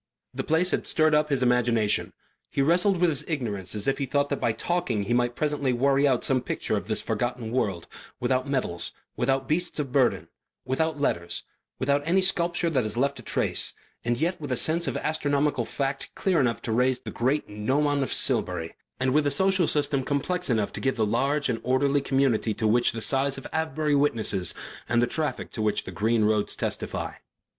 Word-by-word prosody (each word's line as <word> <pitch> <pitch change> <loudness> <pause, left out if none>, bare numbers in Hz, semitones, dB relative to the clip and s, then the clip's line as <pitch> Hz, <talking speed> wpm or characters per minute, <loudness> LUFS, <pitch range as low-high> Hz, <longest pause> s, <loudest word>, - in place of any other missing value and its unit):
The - - -3
place 165 +4 +1
had - - -1
stirred 155 -1 +3
up 150 0 +3
his 140 -3 +1
imagination. 120 -3 +2 0.4
He 135 - 0
wrestled 180 +5 +3
with 175 -1 +3
his 145 - -3
ignorance 110 - -3
as 105 - -3
if 135 - +1
he 140 - -1
thought 145 +2 +1
that 140 - -1
by 115 - +2
talking 170 - -1
he 105 - -1
might 120 0 +1
presently 145 -4 0
worry 140 +3 +3
out 130 -3 +1
some 130 -2 +2
picture - - -2
of - - -3
this - - 0
forgotten 120 -2 -2
world, 100 -9 -1 0.3
without 130 +2 0
metals, 125 -11 -1 0.2
without 135 +2 0
beasts 175 +3 0
of 140 -4 -3
burthen, 130 -2 +2 0.4
without 145 +4 -1
letters, 85 -11 -1 0.3
without 140 +2 +1
any 180 +5 +2
sculpture 175 -2 +1
that 130 -5 +1
has 110 +1 -3
left 140 +2 0
a - - -8
trace, - - 0 0.3
and 120 0 0
yet 170 +2 -1
with 145 -3 -5
a 125 - +1
sense 165 +5 +1
of - - -1
astronomical 145 -4 0
fact 135 +4 -3
clear 185 -4 +1
enough 120 -4 0
to 115 - -3
raise 125 +2 +2
the - - -7
great 130 +5 0
gnomon 140 +8 0
of 135 - -2
Silbury, 80 0 +1 0.3
and 130 0 +1
with 150 0 +3
a - - +4
social 185 +3 +2
system 140 -2 +1
complex 175 +6 -1
enough 110 -4 0
to - - -4
give 135 -1 0
the 110 - +1
large 140 +7 +1
and 115 -2 -1
orderly 140 +3 +2
community 135 -6 +1
to 110 - -2
which 120 +3 +3
the 115 - -6
size 135 +3 +2
of 135 - -9
Avebury 155 -1 0
witnesses 110 - +1 0.3
and 120 - +3
the 120 - +4
traffic 150 0 -3
to 110 - -4
which 110 -1 0
the - - -7
green 110 +4 +1
roads 105 -1 +1
testify. - - -3
135 Hz, 200 wpm, -26 LUFS, 120-150 Hz, 0.4 s, a